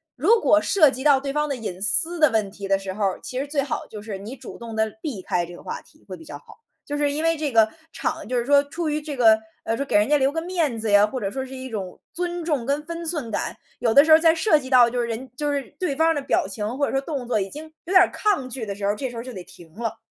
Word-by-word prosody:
如 460 +1 +4
果 310 -6 +4
涉 310 -7 +4
及 260 0 -6
到 285 -2 +5
对 275 0 -4
方 300 0 0
的 280 - -1
隐 195 -6 -6
私 320 - 0
的 305 -2 +6
问 215 -4 0
题 200 -1 -7
的 195 0 +3
时 195 -1 -6
候 210 +2 -3
儿， 195 -2 0
其 255 - -4
实 280 - -3
最 285 -1 0
好 275 - -4
就 215 - -8
是， 210 -3 -6
你 215 +7 -8
主 - - -11
动 230 -1 -7
地 220 0 +1
避 240 - -5
开 175 - 0
这 175 +1 -9
个 - - -13
话 - - -5
题 305 - -25
会 190 - -6
比 165 - -13
较 145 - -8
好， 145 - -17 0.3
就 290 - -4
是 290 -1 +1
因 300 +2 -2
为 330 0 +3
这 300 -2 -2
个 225 -2 +5 0.3
场 315 0 -3
就 250 +1 -1
是 235 - 0
说 285 +1 +5
出 325 +3 -4
于 300 0 -1
这 295 -2 -6
个， 220 -3 +6 0.2
呃， 225 - -1
说 275 - -2
给 - - -1
人 205 +1 +5
家 295 +1 +4
留 270 +1 +2
个 325 - -2
面 330 -8 -1
子 220 -1 -2
呀， 205 +1 +6
或 255 +4 -4
者 200 -3 -3
说 265 - -3
是 265 0 -9
一 260 0 -7
种 200 -7 -6
尊 350 -1 -3
重 295 -7 0
跟 285 +2 0
分 335 +1 -6
寸 300 -9 -3
感， - - -3 0.2
有 230 -1 +2
的 280 +6 +7
时 320 - +2
候 315 - +9
在 325 0 +5
涉 320 -2 +3
及 260 -2 -9
到 250 -3 +7
就 245 +1 -1
是 235 - -2
人 235 +2 -5
就 295 +2 -1
是 280 -1 -1 0.2
对 355 -7 -1
方 320 +3 +3
儿 - - +3
的 290 - -2
表 270 - +1
情 210 +4 -4
或 285 - +2
者 - - -3
说 270 - 0
动 275 -4 -5
作 240 - +1
已 195 - -3
经 300 +9 -8 0.2
有 350 - -6
点 375 - +9
儿 - - +3
抗 410 -11 0
拒 255 -1 -6
的 200 - -4
时 200 0 -4
候 200 - +3
儿， - - -3
这 260 +4 -4
时 245 - -10
候 230 - -4
儿 - - -9
就 255 - -7
得 185 -4 -7
停 165 -2 -16
了。 230 0 -4
260 Hz, 345 characters per minute, -23 LUFS, 220-300 Hz, 0.3 s, 候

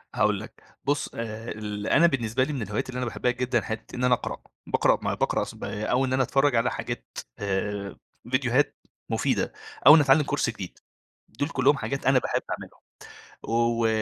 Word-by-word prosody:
هاقول - - +2
لك، - - -12 0.2
بُصّ 145 +1 0
آآ 115 0 -5
ال 105 -1 -5
أنا 170 +2 +6
بالنسبة 125 -3 0
لي 150 - -2
من 130 - -3
الهوايات 105 +5 -3
اللي 125 - -5
أنا 125 - -1
باحبها 125 +1 0
جدًا 125 +1 0
حتة 110 +1 -6
إن 125 - -3
أنا 125 0 +5
أقرأ، - - -5 0.3
باقرأ - - +3
ما - - -1
باقرأ - - 0
س - - -8
با 105 - -5
أو 130 +2 +2
إن 130 - -2
أنا 130 0 +3
أتفرج 135 +1 +2
على 115 +1 +2
حاجات - - -6 0.2
آآ، 100 0 -2 0.4
فيديوهات 130 +1 +2 0.3
مفيدة، - - 0 0.3
أو 150 - +12
إني 150 - +6
أتعلم 140 +2 +5
كورس 140 -3 0
جديد، 100 -6 -7 0.5
دول 145 +6 -3
كلهم 140 -1 +3
حاجات 135 -1 -4
أنا 135 -1 +6
باحب - - -1
أعملهم. - - -7 0.6
و 115 0 +1
125 Hz, 190 wpm, -26 LUFS, 110-135 Hz, 0.6 s, أو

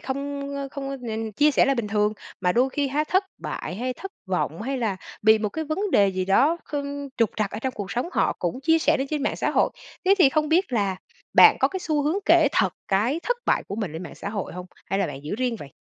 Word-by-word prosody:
không, 280 +1 -4
ơ, 275 -1 -4
không 275 -2 -5
có 275 - -4
nên 225 -3 -4
chia 295 +7 +4
sẻ 285 - +4
là 275 - +2
bình 230 -4 -2
thường. 210 0 +1 0.3
Mà 180 -1 +2
đôi 250 +3 +3
khi 285 0 -1
ha, 295 +3 0
thất 375 +5 +2
bại 180 - -5
hay 250 +4 -2
thất 390 +7 -8
vọng, - - -2
hay 270 +4 -2
là 215 -5 -1 0.3
bị 220 +1 +6
một 210 -1 -1
cái 320 +8 -4
vấn 380 +7 -2
đề 200 - +5
gì 185 -1 -2
đó 270 - +3
kh 295 - -5 0.4
trục 230 -3 +2
trặc 215 -2 0
ở 210 - -5
trong 260 +3 -2
cuộc 200 -1 -5
sống 245 +9 -2
họ - - +2
cũng 180 +9 -2
chia 325 +3 +3
sẻ 310 +1 +3
lên 270 - -1
trên 300 -2 -1
mạng 290 - -1
xã - - 0
hội. - - +2 0.3
Thế 385 +2 +6
thì 315 -7 +7
không 305 +1 0
biết 345 -1 +2
là 200 -5 +1 0.4
bạn - - +8
có - - +4
cái 380 -1 -5
xu 300 -3 0
hướng 310 +6 +1
kể 330 -3 +6
thật 190 -2 +2 0.2
cái 230 +12 +1
thất - - 0
bại - - +2
của 200 - -4
mình 205 -8 -3
lên 165 +3 -6
mạng 175 - -9
xã - - -6
hội 200 -2 -4
hông? 180 +1 -7 0.2
Hay 195 - -1
là 195 - +1
bạn 145 -1 -8
giữ 155 - -3
riêng 245 -1 -1
vậy? 140 -5 -10
255 Hz, 270 wpm, -24 LUFS, 205-295 Hz, 0.4 s, bạn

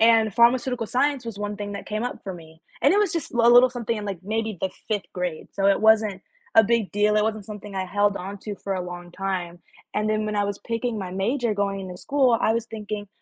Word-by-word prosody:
and 225 -2 +5
pharmaceutical 240 0 +3
science 270 +2 +1
was 225 -3 -6
one 205 0 -3
thing 205 -1 -5
that 200 - -7
came 215 +2 -2
up 245 - -5
for 190 -2 -5
me, 160 -1 -14 0.2
and - - +6
it 410 - +4
was 410 -5 +1
just 330 - -3
l 235 0 +4
a - - +8
little 245 +1 +7
something 235 -2 -2
in, 210 - -5
like, 200 -3 -4
maybe 220 0 -2
the 190 - 0 0.2
5th 210 -3 -1
grade, 180 -3 -3
so 195 0 +1
it 200 - +4
wasn't 215 -3 +4 0.3
a 225 - +9
big 230 -2 +1
deal; 210 +1 +3
it 210 - +4
wasn't 215 -2 -2
something 210 -1 -8
I 190 -1 -1
held 205 +2 +2
onto 200 +3 -6
for 195 -1 -3
a 185 - -2
long 175 0 -8
time, 180 -2 -3 0.3
and 210 - 0
then 215 0 0
when 210 0 -2
I 205 - +2
was 200 0 -3
picking 230 -1 -3
my 185 -2 -5
major 225 +5 0
going 195 -2 -2
to 180 - -7
school, 260 +2 +2
I 220 - +3
was 230 0 -1
thinking, 210 -2 -6
210 Hz, 250 wpm, -24 LUFS, 195-230 Hz, 0.3 s, a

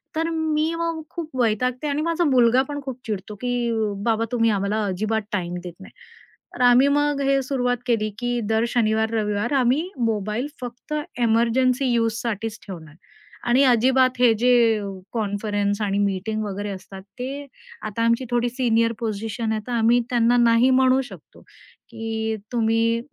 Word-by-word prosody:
तर 325 +1 0
मी 315 0 0
मग 330 -1 -2
खूप 335 -3 -6
वैतागते 250 +5 0
आणि 290 +1 -1
माझा 335 +2 0
मुलगा 250 -1 +4
पण 290 0 -4
खूप 260 -2 -6
चिडतो 210 -1 -4
की, 245 -1 -1 0.4
"बाबा, 230 -1 +1
तुम्ही 230 -2 +2
आम्हाला 210 +2 -1
अजिबात 215 +3 -1
टाईम 180 -4 -2
देत 175 -1 -7
नाही." 190 - -13 0.6
तर - - -5
आम्ही 245 +2 +6
मग 290 0 +1
हे 275 0 +3
सुरुवात 250 -2 0
केली 220 -3 +1
की 245 0 -1
दर 220 0 +2
शनिवार-रविवार 220 0 0
आम्ही 275 +6 +2
मोबाईल 220 +1 -1
फक्त 245 +4 -7 0.2
एमर्जन्सी 240 +3 +2
युजसाठीच 225 -1 -2
ठेवणार. 160 -5 -9 0.5
आणि 250 +3 +4
अजिबात 255 +1 +4
हे 245 -2 +5
जे 250 +2 +3 0.3
अ, 205 - -5 0.3
कॉन्फरन्स 205 -1 -1
आणि 200 -1 0
मीटिंग 205 +2 -1
वगैरे 205 0 -4
असतात, 190 0 -8 0.2
ते 275 +3 -5 0.4
आता 215 +2 -2
आमची 230 +2 +2
थोडी 240 0 +1
सीनियर 230 -2 +1
पोझिशन 220 0 -3
आहे, 215 -1 -1
तर - - -5
आम्ही 235 +1 +3
त्यांना 240 0 +3
नाही 235 +1 +4
म्हणू 260 0 +4
शकतो - - -14 0.5
की 220 0 -3 0.2
तुम्ही 230 0 +1
235 Hz, 155 wpm, -23 LUFS, 215-255 Hz, 0.6 s, आम्ही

